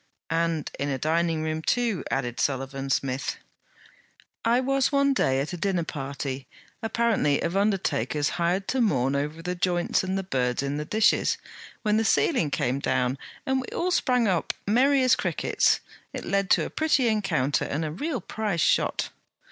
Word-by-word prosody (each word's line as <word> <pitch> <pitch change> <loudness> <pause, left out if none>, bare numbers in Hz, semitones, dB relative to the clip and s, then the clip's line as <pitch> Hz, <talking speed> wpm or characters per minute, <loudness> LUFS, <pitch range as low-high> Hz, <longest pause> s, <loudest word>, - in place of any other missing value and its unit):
'And 165 -2 0
in 140 - -1
a 135 - -1
dining 160 +2 0
room 155 0 -2
too,' 230 +1 0
added 120 -3 -2
Sullivan 135 0 -2
Smith. 135 0 -1 1.1
'I 235 +2 +3
was 270 0 +1
one 280 -1 +3
day 135 - +2
at 145 +6 -3
a - - -3
dinner 185 -2 0
party, 140 -3 -5 0.3
apparently 225 -10 +1
of 170 - -2
undertakers 155 - +1
hired 180 +3 +1
to 260 - +1
mourn 135 - +2
over 150 +4 -3
the 180 +1 -2
joints 175 0 +1
and 190 +1 -1
the 195 - -2
birds 125 -7 -1
in 140 +1 -2
the 150 - -3
dishes, 215 +6 +2 0.5
when 210 -1 +2
the 225 - +2
ceiling 225 - +2
came 130 -1 0
down, 125 -1 0 0.3
and 265 0 +1
we 255 - -8
all 360 +1 0
sprang 250 -8 +2
up 180 -4 0
merry 265 +6 +4
as 255 - +5
crickets. - - +1 0.3
It - - -5
led 195 -1 0
to - - +4
a - - -7
pretty 305 -5 +2
encounter 195 - +1
and 155 +3 -2
a 155 - -3
real 260 - -3
prize 205 -2 -2
shot.' - - +1
170 Hz, 170 wpm, -26 LUFS, 140-225 Hz, 1.1 s, as